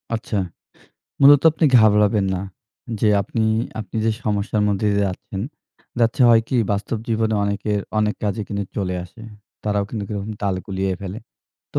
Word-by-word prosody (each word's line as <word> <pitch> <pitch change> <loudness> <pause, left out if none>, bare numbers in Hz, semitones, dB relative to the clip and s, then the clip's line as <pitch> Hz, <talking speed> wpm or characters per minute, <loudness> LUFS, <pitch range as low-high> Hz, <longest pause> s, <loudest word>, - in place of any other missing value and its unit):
আচ্ছা, 110 -2 -3 0.8
মূলত 140 0 +8
আপনি 160 +1 -1
ঘাবড়াবেন 105 -1 +4
না। 90 - -2 0.6
যে 110 - +3
আপনি, 110 +3 -2 0.4
আপনি 105 +1 -7
যে 115 - +3
সমস্যার 105 0 0
মধ্যে 100 +1 0
দিয়ে 100 0 +2
যাচ্ছেন, 95 +1 -6 0.6
যাচ্ছে 115 +4 +3
হয় 115 -1 +6
কি, 130 - 0 0.2
বাস্তব 100 +2 -2
জীবনে 110 -1 +1
অনেকের 100 0 -1 0.2
অনেক 105 0 +1
কাজই 105 +1 -1
কিন্তু 100 -1 -2
চলে 95 -3 -1
আসে। 110 +5 -14 0.4
তারাও 105 -1 0
কিন্তুক 105 -4 -5
এরকম 105 +1 -4
তাল 100 -2 +1
গুলিয়ে 95 -1 -1
ফেলে। 100 +2 -6 0.5
তো - - 0
105 Hz, 160 wpm, -21 LUFS, 100-110 Hz, 0.8 s, মূলত